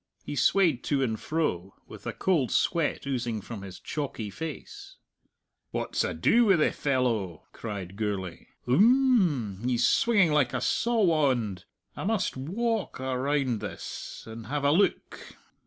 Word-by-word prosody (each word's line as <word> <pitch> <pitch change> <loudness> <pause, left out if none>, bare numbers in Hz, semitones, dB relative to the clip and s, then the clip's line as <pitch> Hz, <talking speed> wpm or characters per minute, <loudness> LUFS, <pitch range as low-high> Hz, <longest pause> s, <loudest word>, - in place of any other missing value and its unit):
He 145 - -5
swayed 160 0 +3
to 140 -2 +1
and 110 -4 -1
fro, 100 - -2
with - - -11
a - - -1
cold 160 -10 +1
sweat 165 -4 +1
oozing 120 -5 -2
from 105 0 -8
his 95 -2 -9
chalky 130 -8 -4
face. 160 +9 -8 0.7
"What's - - -1
ado 230 - +3
wi' 195 - +6
the 155 - +2
fellow?" 120 - -1
cried 100 -4 -6
Gourlay. 100 -5 -3 0.2
"Oom? 180 - +3
He's 125 0 +2
swinging 205 - +3
like 145 -5 +2
a - - 0
saugh 225 0 +1
wand. 130 - +1 0.3
I - - -5
must 210 -4 0
wa 210 - -1
alk - - -13
round 130 -1 -1
this - - -7
and 110 -1 -9
have 145 +2 -2
a 140 - +5
look!" 185 +7 0
135 Hz, 145 wpm, -28 LUFS, 110-170 Hz, 0.7 s, wi